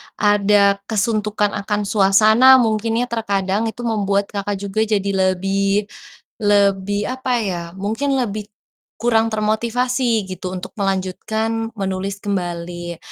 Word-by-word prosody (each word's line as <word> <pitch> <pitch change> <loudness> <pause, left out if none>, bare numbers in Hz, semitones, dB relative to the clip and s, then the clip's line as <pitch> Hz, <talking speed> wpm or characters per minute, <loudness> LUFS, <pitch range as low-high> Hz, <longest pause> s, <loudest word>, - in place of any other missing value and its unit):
ada 205 -1 +3
kesuntukan 210 -1 0
akan 210 +1 -2
suasana 215 +4 +4
mungkin 225 -2 +1
ya - - -1
terkadang 205 -1 -1
itu 235 +2 -6
membuat 200 -1 +1
Kakak 205 0 -3
juga 200 +2 -3
jadi 200 -2 0
lebih 195 +2 0 0.5
lebih 200 -1 +2
apa 260 -1 -4 0.2
ya, 180 -2 -2 0.3
mungkin 270 +6 0
lebih 215 -4 -2 0.5
kurang 225 -1 +2
termotivasi 230 +1 0
gitu 185 -1 -6
untuk 180 - -8
melanjutkan 220 +3 -2
menulis 195 0 -3
kembali, 175 -3 -4
205 Hz, 115 wpm, -19 LUFS, 195-220 Hz, 0.5 s, suasana